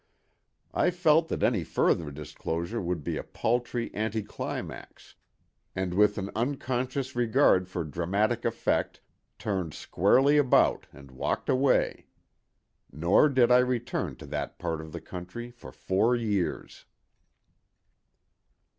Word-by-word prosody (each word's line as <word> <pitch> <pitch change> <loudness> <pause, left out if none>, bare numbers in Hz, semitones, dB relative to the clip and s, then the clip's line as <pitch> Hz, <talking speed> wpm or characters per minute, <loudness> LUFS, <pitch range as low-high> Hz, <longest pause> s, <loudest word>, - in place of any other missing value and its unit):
I - - +3
felt 165 -2 +3
that - - -3
any 110 -8 +2
further 80 0 +1
disclosure 80 - -4
would 90 -4 -3
be - - -2
a - - -4
paltry 120 0 -2
anti 110 0 -2
climax, - - -7 0.6
and 95 -1 -2
with 105 +2 +3
an 100 0 -4
unconscious 130 +1 -2
regard 120 -6 +3
for 90 -2 -3
dramatic 100 +9 -1
effect 115 - -1 0.4
turned 95 -7 -3
squarely 135 - +3
about 140 -4 +3
and 70 -1 -14
walked 65 - -3
away. 130 +1 +2 0.8
Nor 85 - +4
did 125 -3 +3
I 125 - +7
return 125 -1 -1
to - - -11
that - - -4
part 80 -1 -3
of 80 0 -10
the 85 - -7
county 90 +9 -8
for 120 - -12
four 110 +6 +1
years. 105 -6 -2
110 Hz, 125 wpm, -28 LUFS, 90-125 Hz, 0.8 s, I